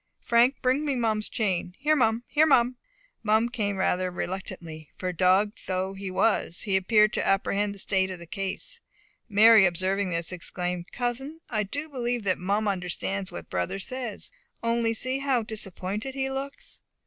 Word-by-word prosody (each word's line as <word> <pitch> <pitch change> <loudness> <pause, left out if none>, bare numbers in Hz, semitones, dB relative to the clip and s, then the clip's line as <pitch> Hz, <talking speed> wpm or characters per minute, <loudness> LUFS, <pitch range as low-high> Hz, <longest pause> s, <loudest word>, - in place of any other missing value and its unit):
Frank, 240 +3 +4
bring 260 +3 +2
me 285 -3 0
Mum's 220 -3 0
chain. 185 -4 -1
Here, 300 +3 +2
Mum! 230 -3 +2
Here, 305 +2 +3
Mum!" 250 -3 +4 0.5
Mum 220 +2 +2
came 210 -5 -1
rather 185 -1 +1
reluctantly; 175 -4 -6
for 185 -1 -3
dog 185 +4 +3 0.2
though 185 +1 -1
he 195 0 -6
was, 185 -2 +1
he 195 -2 0
appeared 210 +3 +4
to - - 0
apprehend 200 +1 +1
the - - -12
state 190 -1 +1
of 185 - -5
the 170 - -10
case. 195 - -3 0.5
Mary 215 +1 +7
observing 185 +3 0
this, 170 0 -1
exclaimed, 180 0 -4
"Cousin, 260 +6 -3
I 215 -2 +1
do 285 +10 -4
believe 245 -5 -2
that 185 -2 +1
Mum 200 +4 0
understands 190 0 -2
what 85 - -9
brother 90 - -1
says. 245 +1 -4 0.3
Only 230 -1 +1
see 255 +4 +1
how 270 -4 +1
disappointed 215 +3 -4
he 270 0 -1
looks!" 275 - -6
210 Hz, 165 wpm, -27 LUFS, 185-240 Hz, 0.5 s, Mary